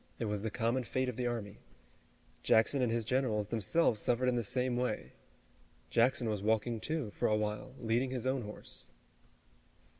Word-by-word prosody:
It 115 Hz, -, -2 dB
was 105 Hz, -1 st, -2 dB
the 110 Hz, -, -2 dB
common 115 Hz, +5 st, 0 dB
fate 130 Hz, +2 st, -1 dB
of 125 Hz, -, -5 dB
the 125 Hz, 0 st, -1 dB
army. 105 Hz, -4 st, -4 dB, 0.8 s
Jackson 115 Hz, +5 st, +4 dB
and 120 Hz, -2 st, +2 dB
his 115 Hz, -1 st, 0 dB
generals, 115 Hz, -5 st, 0 dB
themselves, 115 Hz, -, +2 dB
suffered 125 Hz, +1 st, +2 dB
in -, -, +1 dB
the 120 Hz, -1 st, 0 dB
same 125 Hz, +3 st, +1 dB
way. 125 Hz, +1 st, -2 dB, 0.8 s
Jackson 120 Hz, +1 st, +3 dB
was 105 Hz, -3 st, -1 dB
walking, 110 Hz, +2 st, +1 dB
too, 155 Hz, -5 st, -2 dB
for -, -, 0 dB
a 105 Hz, -, +3 dB
while, 105 Hz, +4 st, -3 dB
leading 120 Hz, +3 st, +1 dB
his 125 Hz, -2 st, -3 dB
own 130 Hz, 0 st, +1 dB
horse. 105 Hz, -2 st, -7 dB
115 Hz, 175 wpm, -33 LUFS, 105-125 Hz, 0.8 s, Jackson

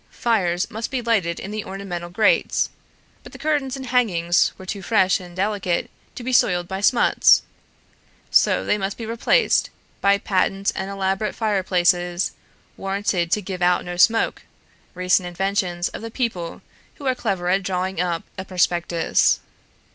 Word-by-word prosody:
Fires 190 Hz, -4 st, 0 dB
must 225 Hz, +1 st, -4 dB
be 265 Hz, -, -2 dB
lighted 205 Hz, -8 st, 0 dB
in 195 Hz, -, -7 dB
the 215 Hz, 0 st, -4 dB
ornamental 190 Hz, -3 st, -6 dB
grates, 210 Hz, +4 st, +2 dB, 0.5 s
but -, -, -14 dB
the -, -, -9 dB
curtains 290 Hz, -4 st, -1 dB
and 265 Hz, -, -7 dB
hangings 190 Hz, -9 st, +2 dB
were 190 Hz, -, -11 dB
too 195 Hz, +1 st, -5 dB
fresh 190 Hz, -1 st, +2 dB
and 175 Hz, -2 st, -12 dB
delicate 190 Hz, -2 st, -1 dB, 0.2 s
to 245 Hz, -, -7 dB
be 255 Hz, +1 st, -3 dB
soiled 175 Hz, -7 st, +3 dB
by 190 Hz, +1 st, -4 dB
smuts, 240 Hz, +3 st, +4 dB, 0.9 s
so -, -, +3 dB
they 210 Hz, -, +1 dB
must 195 Hz, 0 st, -3 dB
be 230 Hz, -, -6 dB
replaced 235 Hz, -, +2 dB, 0.3 s
by 200 Hz, 0 st, +4 dB
patent 195 Hz, 0 st, 0 dB
and 190 Hz, -1 st, -3 dB
elaborate 195 Hz, +1 st, -1 dB
fireplaces, 180 Hz, -4 st, +1 dB, 0.5 s
warranted 195 Hz, -3 st, -1 dB
to 210 Hz, -, +1 dB
give 185 Hz, -1 st, -6 dB
out 180 Hz, 0 st, +2 dB
no 175 Hz, 0 st, -5 dB
smoke, 225 Hz, +5 st, +3 dB, 0.5 s
recent 180 Hz, 0 st, +2 dB
inventions 180 Hz, -1 st, -1 dB
of -, -, -8 dB
the 230 Hz, -, -6 dB
people 225 Hz, -9 st, -3 dB, 0.3 s
who 285 Hz, -, -11 dB
are 260 Hz, -, +2 dB
clever 190 Hz, -7 st, -2 dB
at 190 Hz, +2 st, +2 dB
drawing 185 Hz, 0 st, -2 dB
up 175 Hz, -2 st, -1 dB, 0.2 s
a -, -, -3 dB
prospectus. 175 Hz, -2 st, +1 dB
195 Hz, 155 wpm, -22 LUFS, 180-215 Hz, 0.9 s, smuts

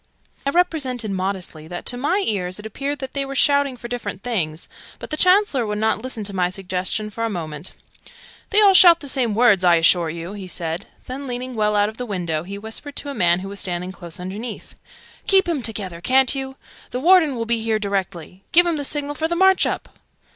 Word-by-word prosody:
I -, -, +4 dB
represented, 280 Hz, -, 0 dB
modestly, 185 Hz, -5 st, -3 dB
that 175 Hz, +1 st, -7 dB
to -, -, -1 dB
my 345 Hz, +11 st, 0 dB
ears 185 Hz, -3 st, -1 dB
it 210 Hz, -, -10 dB
appeared 275 Hz, +7 st, -3 dB
that 265 Hz, -1 st, -7 dB
they 280 Hz, -, -1 dB
were 275 Hz, 0 st, -6 dB
shouting 280 Hz, -2 st, +2 dB
for 235 Hz, -, -7 dB
different 240 Hz, -5 st, -5 dB
things, 170 Hz, -10 st, -2 dB, 0.3 s
but -, -, -10 dB
the -, -, 0 dB
Chancellor 365 Hz, -, +3 dB
would 210 Hz, 0 st, -2 dB
not 220 Hz, 0 st, 0 dB
listen 250 Hz, -3 st, -4 dB
to 200 Hz, 0 st, -2 dB
my 180 Hz, -2 st, +1 dB
suggestion 190 Hz, +3 st, -3 dB
for 230 Hz, +2 st, -4 dB
a 230 Hz, -, 0 dB
moment. 160 Hz, -4 st, -6 dB, 0.8 s
"They 420 Hz, 0 st, +5 dB
all 395 Hz, -1 st, +7 dB
shout 345 Hz, -3 st, +8 dB
the 285 Hz, -, -7 dB
same 250 Hz, -6 st, +1 dB
words, 220 Hz, -5 st, +4 dB
I 175 Hz, -1 st, +6 dB
assure 170 Hz, 0 st, +3 dB
you!" 170 Hz, +4 st, -6 dB
he 200 Hz, -3 st, -8 dB
said: 170 Hz, +1 st, -4 dB, 0.2 s
then, 270 Hz, +2 st, -6 dB
leaning 250 Hz, +1 st, -4 dB
well 210 Hz, -2 st, +1 dB
out 205 Hz, 0 st, +3 dB
of 220 Hz, +1 st, -8 dB
the 250 Hz, -, -5 dB
window, 170 Hz, -6 st, -2 dB
he 195 Hz, +4 st, -7 dB
whispered 225 Hz, +7 st, -7 dB
to 285 Hz, -, -2 dB
a -, -, -4 dB
man 175 Hz, -6 st, +2 dB
who 195 Hz, -, -6 dB
was 200 Hz, 0 st, -7 dB
standing 180 Hz, -1 st, -2 dB
close 175 Hz, -3 st, -8 dB
underneath, 205 Hz, +6 st, -7 dB, 0.5 s
"Keep'em 350 Hz, -7 st, +3 dB
together, 200 Hz, -7 st, -4 dB
ca'n't 260 Hz, +6 st, +4 dB
you? 265 Hz, -1 st, -4 dB, 0.3 s
The 250 Hz, -, -3 dB
Warden 325 Hz, -2 st, +5 dB
will 230 Hz, -1 st, -3 dB
be 230 Hz, 0 st, 0 dB
here 220 Hz, -1 st, +1 dB
directly. 195 Hz, -3 st, -4 dB
Give'em 345 Hz, -1 st, +5 dB
the 290 Hz, -, -3 dB
signal 290 Hz, 0 st, -2 dB
for 320 Hz, +2 st, -1 dB
the 340 Hz, -, -2 dB
march 380 Hz, +1 st, +4 dB
up!" -, -, -5 dB
220 Hz, 215 wpm, -21 LUFS, 185-275 Hz, 0.8 s, shout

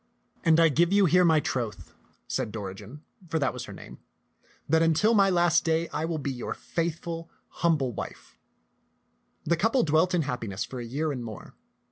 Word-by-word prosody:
" -, -, -38 dB
And 165 Hz, -1 st, +5 dB
I 165 Hz, -1 st, +6 dB
give 170 Hz, +5 st, +2 dB
you 200 Hz, 0 st, +5 dB
here 180 Hz, +2 st, +4 dB
my 160 Hz, -3 st, +5 dB
troth," 120 Hz, -6 st, -4 dB, 0.3 s
said -, -, -2 dB
Dori 100 Hz, -4 st, -5 dB
gen, 110 Hz, +10 st, -12 dB, 0.3 s
for 160 Hz, -, 0 dB
that 140 Hz, -4 st, 0 dB
was -, -, -6 dB
her -, -, -10 dB
name, -, -, -11 dB, 0.7 s
that 160 Hz, +2 st, +3 dB
until 165 Hz, +8 st, +3 dB
my 200 Hz, -3 st, +5 dB
last 175 Hz, -2 st, +3 dB
day 165 Hz, 0 st, 0 dB
I 155 Hz, -, -2 dB
will 165 Hz, -1 st, -2 dB
be 140 Hz, -2 st, -3 dB
your 125 Hz, -2 st, -5 dB
faithful, 165 Hz, 0 st, -4 dB, 0.2 s
humble 150 Hz, -8 st, 0 dB
wife." -, -, -8 dB, 1.1 s
The 170 Hz, -, +2 dB
couple 225 Hz, +9 st, +2 dB
dwelt 160 Hz, +4 st, +2 dB
in 165 Hz, -, +2 dB
happiness 120 Hz, -8 st, -3 dB
for 130 Hz, -, -7 dB
a 120 Hz, -, -5 dB
year 145 Hz, +6 st, -2 dB
and 125 Hz, -4 st, -4 dB
more. 110 Hz, -5 st, -9 dB
160 Hz, 190 wpm, -27 LUFS, 130-170 Hz, 1.1 s, I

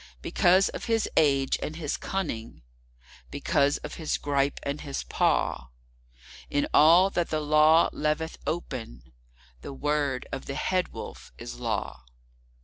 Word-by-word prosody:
Because 185 Hz, +2 st, +4 dB
of -, -, -6 dB
his 225 Hz, -2 st, +1 dB
age 140 Hz, -3 st, +3 dB
and 155 Hz, -, -4 dB
his 155 Hz, -3 st, -3 dB
cunning, 115 Hz, -, -4 dB, 0.7 s
because 140 Hz, -, +1 dB
of 150 Hz, -, -6 dB
his 155 Hz, -, -1 dB
gripe 140 Hz, -1 st, 0 dB
and 140 Hz, +1 st, -3 dB
his 140 Hz, -2 st, -4 dB
paw, -, -, 0 dB, 0.8 s
In 145 Hz, -, +1 dB
all 170 Hz, +5 st, +6 dB
that 175 Hz, -3 st, -1 dB
the 155 Hz, -, 0 dB
Law 155 Hz, +2 st, +5 dB
leaveth 155 Hz, +2 st, -2 dB
open, 115 Hz, -, -5 dB, 0.5 s
the 140 Hz, -, -7 dB
word 145 Hz, -2 st, -1 dB
of -, -, -6 dB
the 135 Hz, -, -4 dB
Head 185 Hz, -1 st, 0 dB
Wolf -, -, -9 dB
is -, -, -8 dB
Law. 60 Hz, 0 st, -3 dB
150 Hz, 140 wpm, -27 LUFS, 135-160 Hz, 0.8 s, all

